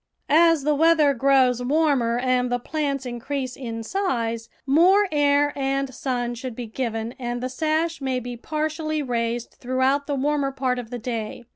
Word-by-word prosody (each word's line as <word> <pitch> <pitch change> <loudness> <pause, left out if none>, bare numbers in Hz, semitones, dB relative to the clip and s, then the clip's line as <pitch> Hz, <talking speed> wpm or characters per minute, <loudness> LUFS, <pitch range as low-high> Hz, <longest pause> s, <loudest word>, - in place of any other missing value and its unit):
As 330 -1 +5
the 300 +1 +2
weather 310 -1 +4
grows 260 -1 +3
warmer 265 -4 +2
and 250 0 +1
the 245 - +2
plants 275 +1 -3
increase 255 +2 -4
in 230 -3 -5
size, 230 - -2 0.2
more 360 +9 +5
air 290 -1 +3
and 275 -1 -1
sun 245 -2 -2
should 240 0 -6
be 245 - -5
given 225 -1 -3
and 240 -1 -3
the 255 +1 -3
sash 315 +4 -1
may 260 -2 -1
be 245 0 -6
partially 310 +3 -2
raised 235 -2 -2
throughout 260 +3 +1
the 290 - -1
warmer 280 0 0
part 260 -2 -1
of 235 -2 -8
the 245 - -5
day. 230 -1 -5
265 Hz, 165 wpm, -24 LUFS, 245-295 Hz, 0.2 s, As